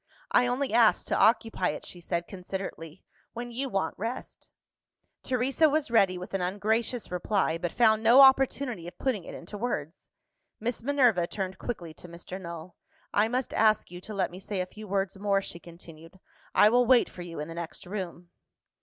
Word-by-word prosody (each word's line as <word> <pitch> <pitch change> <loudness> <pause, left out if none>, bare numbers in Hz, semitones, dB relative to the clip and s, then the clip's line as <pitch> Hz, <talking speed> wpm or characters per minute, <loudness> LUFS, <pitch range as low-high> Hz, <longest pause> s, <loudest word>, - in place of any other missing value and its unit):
"I 245 - +4
only 255 0 -1
ask 230 -2 +4
to - - +1
occupy 225 -4 +3
it," 150 - -5
she 175 - -9
said 170 0 -3
considerately, 185 -3 -7 0.3
"when 240 +1 -6
you 265 +3 -3
want 195 -7 -1
rest." 230 +5 -6 0.7
Teresa 260 +5 +2
was 290 -4 0
ready 195 -5 +4
with 180 +2 -8
an 195 - -1
ungracious 215 +6 -1
reply, 180 -2 0
but 175 -1 -2
found 220 -2 +4
no 235 +4 +7
opportunity 265 -7 +4
of 175 - -10
putting 225 -10 -1
it - - -8
into 200 +4 -9
words. 170 -9 -4 0.5
Miss 235 +2 -2
Minerva 245 -9 +3
turned 190 -1 -5
quickly 175 -9 -5
to 175 - -12
Mr. 175 +2 -9
Null. 170 0 -8 0.4
"I 210 +2 +3
must 250 +2 -2
ask 215 -4 +2
you 180 0 -8
to 215 - -8
let 190 -3 0
me 180 - -9
say 195 0 -4
a 180 - 0
few 215 +3 -11
words 195 0 -1
more," 200 -1 +2
she 170 -3 -7
continued; 170 +1 -14 0.4
"I 210 - +7
will 245 +1 +3
wait 250 -1 +5
for 180 - -10
you 170 -3 -7
in 150 - -4
the 165 - -7
next 170 -1 -7
room." 180 -2 -6
195 Hz, 190 wpm, -28 LUFS, 175-235 Hz, 0.7 s, no